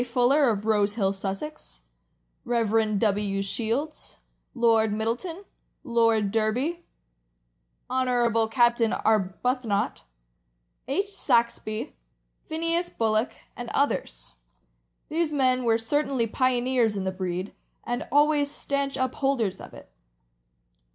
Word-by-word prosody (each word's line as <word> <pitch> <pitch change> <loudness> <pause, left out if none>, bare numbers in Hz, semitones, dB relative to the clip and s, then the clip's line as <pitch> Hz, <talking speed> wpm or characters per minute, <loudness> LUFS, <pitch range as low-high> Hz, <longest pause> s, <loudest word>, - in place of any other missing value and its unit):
Fuller, 250 +3 +3
of 210 -2 -2
Rosehill, 205 -2 +1
Sussex; 195 - -6 0.6
Rev. 225 -2 +1
W. 200 -1 0
Shields, 235 +9 -3 0.4
Lord 225 -3 +3
Middleton, 240 - -3 0.4
Lord 230 -3 +2
Derby, 250 +11 0 1.0
Hon. 245 -3 +1
Captain 240 -1 +3
Arbuthnott, 215 +2 0 0.9
H. 370 +9 0
Saxby, 235 - 0 0.5
Phineas 335 +2 0
Bullock, 220 +1 0 0.2
and 240 -1 -6
others. - - -1 0.8
These 325 0 0
men 255 -3 +2
were 225 -1 +4
cer 260 +7 0
tainly 235 -6 -2
pioneers 250 -3 +2
in 195 - -2
the 190 - -1
breed, 185 +1 -4 0.3
and 240 +1 -3
always 290 0 +3
stanch 280 -1 -2
upholders 260 -6 -1
of - - -10
it. - - -14
235 Hz, 100 wpm, -26 LUFS, 215-270 Hz, 1.0 s, were